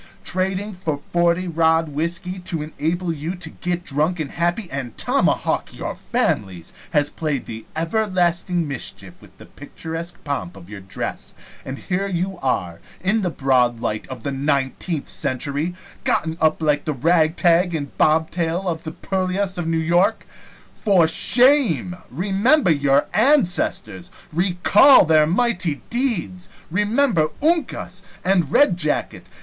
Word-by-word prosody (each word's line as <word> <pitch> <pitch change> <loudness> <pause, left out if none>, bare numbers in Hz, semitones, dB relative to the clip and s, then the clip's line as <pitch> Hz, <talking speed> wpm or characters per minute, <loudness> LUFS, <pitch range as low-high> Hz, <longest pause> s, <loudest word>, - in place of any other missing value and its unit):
Trading 190 +3 -1
for 165 -5 -3
forty 170 +4 0
rod 160 -1 +2
whisky, 170 +5 -3
to 175 -4 -4
enable 165 +3 -2
you 160 +4 -5
to 170 -3 -6
get 175 0 -3
drunk 155 +4 -1
and 150 -3 -4
happy 175 +5 -1
and 130 -4 -5
tomahawk - - +1
your - - -4
families, 90 -5 -2 0.2
has 145 -3 +1
played 150 -5 -3
the 110 0 -8
everlasting 175 -1 0
mischief 140 -4 -6
with - - -19
the - - -13
picturesque 165 +4 -8
pomp 100 - -4
of 95 +1 -14
your 105 - -7
dress, 95 +1 -6 0.3
and 135 +1 -6
here 195 +4 -2
you 185 0 -3
are, 90 -10 -2 0.2
in 210 +4 +2
the 185 - -1
broad 125 -6 +1
light 110 -2 -3
of 125 -3 -9
the 140 - -2
nineteenth 140 +3 -2
century, 145 +6 -2 0.3
gotten 160 0 0
up 160 0 +2
like 150 -1 +1
the 155 - -1
ragtag 165 +4 +2
and 145 -3 -5
bobtail 165 +3 +1
of 165 -2 -2
the 160 - -5
purlieus 190 0 -2
of 170 - -3
New 165 0 0
York. 170 +4 +1 0.5
For 190 -6 +3
shame! 240 - +4
Remember 195 - +2
your 140 -1 +2
ancestors! 195 - +2 0.2
Recall 185 - +5
their 155 -1 +4
mighty 180 - 0
deeds! 205 -7 -2 0.2
Remember 210 - +2 0.2
Uncas! 330 +1 -1 0.2
and 180 -5 +1
Red 200 -12 +4
jacket! 155 -4 -1
170 Hz, 140 wpm, -21 LUFS, 145-185 Hz, 0.5 s, Recall